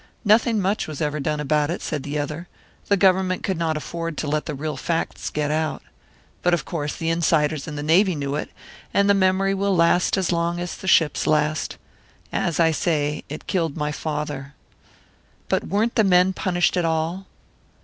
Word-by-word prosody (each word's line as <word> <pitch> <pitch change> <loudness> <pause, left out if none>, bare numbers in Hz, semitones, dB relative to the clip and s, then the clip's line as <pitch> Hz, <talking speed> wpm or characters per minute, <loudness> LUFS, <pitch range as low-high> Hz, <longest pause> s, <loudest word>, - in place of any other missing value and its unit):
"Nothing 220 +1 +4
much 200 +2 0
was 155 -3 -6
ever 150 -1 -1
done 150 +1 -1
about 150 0 +1
it," 170 - -2
said 150 -4 -3
the 145 +2 -4
other. 150 +4 -4 0.4
"The 200 - +3
Government 185 -1 +2
could 190 -4 -1
not 160 -2 0
afford 165 +1 -5
to 155 - -2
let 150 +1 -1
the 150 - -3
real 150 +1 -3
facts 165 +5 -2
get 150 -1 -1
out. 155 0 -1 0.6
But, 180 0 +3
of 150 - -5
course, 150 -4 -3
the 165 0 -1
insiders 155 -3 +1
in 150 - -5
the 145 - -4
Navy 180 +4 +4
knew 140 -1 -3
it, 150 - -3 0.5
and 200 0 +4
the 200 - +6
memory 195 0 +2
will 195 0 +1
last 170 +2 +3
as 190 -2 0
long 170 0 0
as 175 0 -4
the 190 - -9
ships 165 -4 +3
last. 155 0 +1 0.6
As 170 - 0
I 165 -1 +5
say, 150 -2 0
it 150 - -7
killed 165 -5 -1
my 150 -1 -1
father." 150 -2 -4 0.9
"But - - 0
weren't 215 +5 +1
the 220 - +3
men 185 -1 +4
punished 175 -2 +1
at 175 - +2
all?" 165 +3 -1
165 Hz, 190 wpm, -23 LUFS, 150-185 Hz, 0.9 s, the